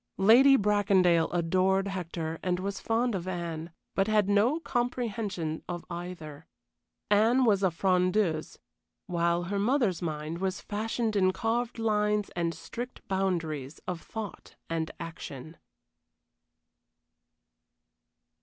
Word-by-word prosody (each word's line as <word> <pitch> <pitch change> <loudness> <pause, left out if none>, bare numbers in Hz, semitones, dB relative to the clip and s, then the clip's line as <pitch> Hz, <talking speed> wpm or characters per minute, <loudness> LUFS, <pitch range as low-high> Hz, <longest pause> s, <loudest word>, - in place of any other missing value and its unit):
Lady 255 +8 +7
Bracondale 195 -5 +3
adored 185 +3 +2
Hector 165 -3 -4
and 180 -1 0
was 195 +1 -3
fond 230 +1 0
of 185 -2 -3
Anne, 170 -3 -4 0.2
but 195 +1 +1
had 210 -2 +3
no 215 +10 +3
comprehension 225 - -2
of 175 -1 -4
either. 170 -4 -7 0.6
Anne 230 +5 +4
was 205 -4 +3
a 190 - +4
frondeuse, 180 -1 +1 0.5
while 170 0 +1
her 200 +3 -2
mother's 225 - +1
mind 155 0 -3
was 190 +1 -1
fashioned 220 +1 -2
in 185 -2 +4
carved 230 +4 -1
lines 210 -2 +1
and 170 -1 -1
strict 245 +2 -8
boundaries 165 -7 -2
of 180 -2 -3
thought 220 -3 -8 0.2
and 160 -1 -1
action. 160 -2 -8
190 Hz, 115 wpm, -29 LUFS, 170-215 Hz, 0.6 s, Lady